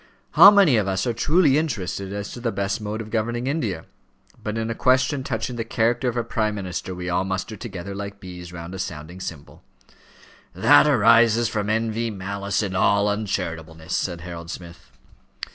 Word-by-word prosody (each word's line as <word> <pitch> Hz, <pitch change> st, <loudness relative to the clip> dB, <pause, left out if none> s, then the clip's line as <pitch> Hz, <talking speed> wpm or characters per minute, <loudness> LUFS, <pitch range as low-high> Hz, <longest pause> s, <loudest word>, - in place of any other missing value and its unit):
How 200 Hz, -, +10 dB
many 195 Hz, -, +5 dB
of 105 Hz, -2 st, +1 dB
us 95 Hz, 0 st, -1 dB
are 120 Hz, -, 0 dB
truly 150 Hz, +4 st, +3 dB
interested 100 Hz, -, -3 dB
as 100 Hz, 0 st, -5 dB
to -, -, -8 dB
the 120 Hz, -1 st, -1 dB
best 100 Hz, +2 st, -2 dB
mode 105 Hz, +1 st, -4 dB
of 110 Hz, -1 st, -9 dB
governing 120 Hz, +2 st, -1 dB
India? 115 Hz, -, -2 dB, 0.6 s
But 105 Hz, +1 st, -4 dB
in 115 Hz, 0 st, -2 dB
a -, -, -1 dB
question 130 Hz, +3 st, +2 dB
touching 120 Hz, +1 st, -3 dB
the 115 Hz, -, -1 dB
character 115 Hz, +3 st, 0 dB
of 120 Hz, -, -5 dB
a 120 Hz, -, +1 dB
prime 110 Hz, -2 st, -1 dB
minister 95 Hz, -1 st, -5 dB
we 90 Hz, 0 st, -6 dB
all 90 Hz, +1 st, +1 dB
muster 95 Hz, +3 st, -3 dB
together 100 Hz, -3 st, -7 dB
like 100 Hz, 0 st, -7 dB
bees 90 Hz, -2 st, -9 dB
round 85 Hz, 0 st, -8 dB
a 95 Hz, -, -6 dB
sounding 85 Hz, -1 st, -6 dB
cymbal." 80 Hz, -5 st, -8 dB, 0.9 s
"That -, -, +6 dB
arises 115 Hz, -2 st, +5 dB
from 105 Hz, -2 st, -2 dB
envy, 115 Hz, +1 st, 0 dB
malice, 100 Hz, 0 st, -3 dB
and 95 Hz, -2 st, -3 dB
all 100 Hz, +2 st, +3 dB
uncharitableness," 80 Hz, -5 st, -3 dB
said 85 Hz, -2 st, -2 dB
Harold 85 Hz, -1 st, -8 dB
Smith. 85 Hz, -1 st, -10 dB
105 Hz, 180 wpm, -23 LUFS, 95-115 Hz, 0.9 s, How